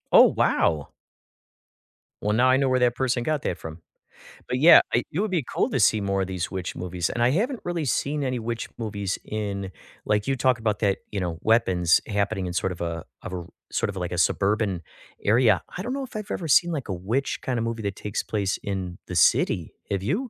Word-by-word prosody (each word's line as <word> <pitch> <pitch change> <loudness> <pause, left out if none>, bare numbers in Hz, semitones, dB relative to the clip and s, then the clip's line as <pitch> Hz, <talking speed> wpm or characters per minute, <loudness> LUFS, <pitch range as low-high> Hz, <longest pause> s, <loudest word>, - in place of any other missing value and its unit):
Oh, - - +10
wow. 75 -3 +1 1.3
Well, 105 - +1
now 125 +4 +4
I 130 - +5
know 135 0 +2
where 130 0 +2
that 125 -1 +3
person 125 -2 0
got 155 -1 0
that 90 - -2
from. 80 0 -8 0.7
But, 125 0 -1
yeah, 165 +4 +9
I 120 - +3
it 160 - -2
would 210 -1 0
be 170 -5 +1
cool - - +1
to 135 - -1
see 110 +2 +4
more 100 -1 0
of 95 - -1
these 90 -2 -3
witch 95 -2 -4
movies, 90 0 -2
and 120 - -3
I 120 - +5
haven't 230 - 0
really 175 -3 -2
seen 145 +2 0
any 130 -2 -1
witch 115 0 -4
movies 100 -4 -3
in 100 -3 -4 0.3
like 105 -1 +1
you 135 - +1
talk 125 -1 +2
about 105 -2 -1
that, 100 -2 +2
you 100 - -2
know, 85 -3 -3
weapons 95 -7 +3
happening 100 -2 -1
in 90 - -3
sort 90 +1 0
of 85 - -11
a 85 -1 -3 0.2
of - - -7
a 90 - -2
r 85 - -7 0.3
sort - - 0
of - - -6
like - - -3
a - - -3
suburban 100 -3 +1 0.4
area. 115 +1 +4 0.2
I 180 - -3
don't 245 +5 -3
know 275 0 -3
if 255 - -10
I've 210 -1 -5
ever 170 - -3
seen, 170 +4 +4
like, 145 -6 -3
a 95 - -2
witch 110 +10 -2
kinda 125 -3 -1
movie 115 0 -3
that 100 -1 -2
takes 105 -1 -3
place 100 -3 -1
in 95 -3 -4
the - - -5
city. - - +3 0.2
Have 100 -1 -1
you? 140 - +1
110 Hz, 230 wpm, -25 LUFS, 95-130 Hz, 1.3 s, Oh